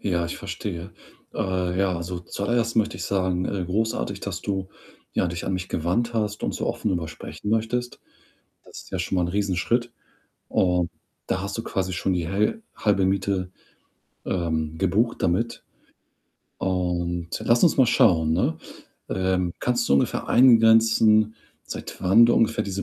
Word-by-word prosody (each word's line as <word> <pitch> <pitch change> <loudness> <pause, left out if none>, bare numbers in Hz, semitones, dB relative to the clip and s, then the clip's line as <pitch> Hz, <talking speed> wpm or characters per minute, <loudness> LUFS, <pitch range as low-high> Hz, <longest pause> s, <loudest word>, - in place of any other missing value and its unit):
Ja, 85 -4 0
ich - - -5
verstehe. 85 +2 -6 0.4
Äh, 90 -1 -1
ja, 95 -3 +1
also, 85 +1 -5
zuallererst 115 +6 -1
möchte 110 - +1
ich - - -6
sagen, 95 -2 0
äh, 95 -3 -2
großartig, 110 +5 -2
dass - - -4
du, 95 -2 -3 0.4
ja, - - +1
dich 85 0 -4
an 95 - -2
mich 90 0 -4
gewandt 115 +9 -1
hast 105 -2 -1
und - - -1
so - - -3
offen 110 - -2
darüber 85 -3 -2
sprechen 105 +5 -7
möchtest. 115 +2 -1 0.6
Das - - -11
ist - - -17
ja 95 - -2
schon 95 +1 -2
mal 90 - +2
'n 85 - 0
Riesenschritt 105 +5 0 0.6
und 90 -2 +2 0.4
da 95 - -1
hast 100 +3 -4
du 115 - -3
quasi 95 -1 -2
schon 95 +2 0
die 85 -2 -1
häl 105 - 0
halbe 100 -3 +2
Miete, 95 -1 -1 0.8
ähm, 80 -3 -1
gebucht 100 +6 +1
damit 115 +7 0 0.9
und 85 -2 -1
lass 120 +1 +3
uns 165 - +4
mal 130 - +6
schauen, 80 -8 +4
ne? 80 -2 +1 0.5
Ähm, 95 -2 0
kannst 120 -1 0
du - - +3
ungefähr 70 - 0
eingrenzen, 110 -3 +5 0.3
seit - - -7
wann 110 +6 +6
du 120 - +3
ungefähr 115 -1 +2
diese 100 0 -3
95 Hz, 165 wpm, -24 LUFS, 90-110 Hz, 0.9 s, mal